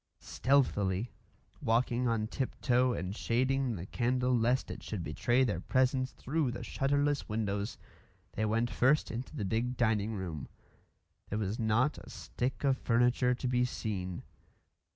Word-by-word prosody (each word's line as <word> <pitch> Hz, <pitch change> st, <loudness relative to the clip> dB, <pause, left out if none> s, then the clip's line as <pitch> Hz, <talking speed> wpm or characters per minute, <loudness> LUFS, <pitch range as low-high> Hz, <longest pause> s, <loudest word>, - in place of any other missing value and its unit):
Stealthily, 115 Hz, -6 st, +1 dB, 0.5 s
walking 120 Hz, +2 st, +1 dB
on 115 Hz, -2 st, +1 dB
tip 130 Hz, +4 st, -4 dB
toe 125 Hz, 0 st, +3 dB
and 95 Hz, -4 st, -3 dB
shading 130 Hz, +1 st, +1 dB
the 90 Hz, -1 st, -6 dB
candle 125 Hz, +3 st, +1 dB
lest 120 Hz, +3 st, +1 dB
it -, -, -7 dB
should 100 Hz, -6 st, -4 dB
betray 120 Hz, -, +2 dB
their 105 Hz, -9 st, 0 dB
presence 130 Hz, +4 st, +1 dB
through 150 Hz, 0 st, -1 dB
the 120 Hz, -, -5 dB
shutterless 145 Hz, 0 st, 0 dB
windows, 105 Hz, -1 st, -2 dB, 0.5 s
they 110 Hz, -, -2 dB
went 115 Hz, +2 st, +1 dB
first 130 Hz, +9 st, +3 dB
into 120 Hz, +3 st, -6 dB
the 105 Hz, -, -2 dB
big 120 Hz, +5 st, -1 dB
dining 110 Hz, -2 st, +1 dB
room. 85 Hz, -7 st, -5 dB, 0.8 s
There 105 Hz, -, -2 dB
was 105 Hz, 0 st, -2 dB
not 115 Hz, +6 st, +2 dB
a -, -, -13 dB
stick 125 Hz, 0 st, -4 dB
of 135 Hz, -2 st, +2 dB
furniture 125 Hz, +1 st, +3 dB
to 125 Hz, -, -3 dB
be 125 Hz, 0 st, +2 dB
seen. 95 Hz, -7 st, -3 dB
120 Hz, 150 wpm, -32 LUFS, 105-130 Hz, 0.8 s, toe